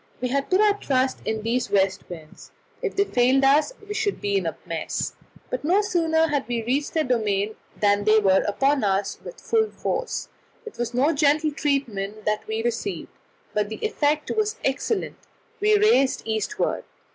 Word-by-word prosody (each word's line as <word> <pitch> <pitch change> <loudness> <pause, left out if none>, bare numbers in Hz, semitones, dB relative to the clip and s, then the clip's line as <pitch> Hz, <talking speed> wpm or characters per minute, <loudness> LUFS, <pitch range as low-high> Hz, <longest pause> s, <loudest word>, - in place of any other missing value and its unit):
We 250 - -2
had 275 +2 -1
put 370 - +3
our 420 -1 +5
trust 260 -4 0
in 220 -1 -2
these 240 +2 0
west 195 -1 +1
winds; 160 -3 -11 0.3
if 445 -5 -3
they 400 - +4
failed 260 -5 +2
us 285 - +4 0.2
we 415 - -4
should 425 -2 -1
be 200 -1 -1
in 190 -3 +1
a 165 - -4
mess. 165 -1 -3 0.4
But - - -3
no 370 +7 +3
sooner 325 -4 +2
had 285 -2 -1
we 235 -2 -2
reached 275 +7 -1
their 315 - +3
domain 215 -5 0 0.3
than 205 0 +3
they 215 0 +5
were 195 -3 +4
upon 270 +5 +1
us 195 0 0
with - - -9
full 440 -1 +1
force; - - -3 0.4
it 445 - -10
was 240 0 -2
no 285 +6 +3
gentle 300 +1 +2
treatment 220 -9 -2
that 210 0 -1
we 220 +1 -2
received, 240 - -3 0.4
but 210 -1 0
the 220 - -5
effect 300 -7 0
was 430 0 0
excellent 330 +10 -1 0.4
we 420 +1 +4
raced 410 - +3
to - - -25
the 225 - -2
eastward. 220 - -1
265 Hz, 185 wpm, -24 LUFS, 215-325 Hz, 0.4 s, our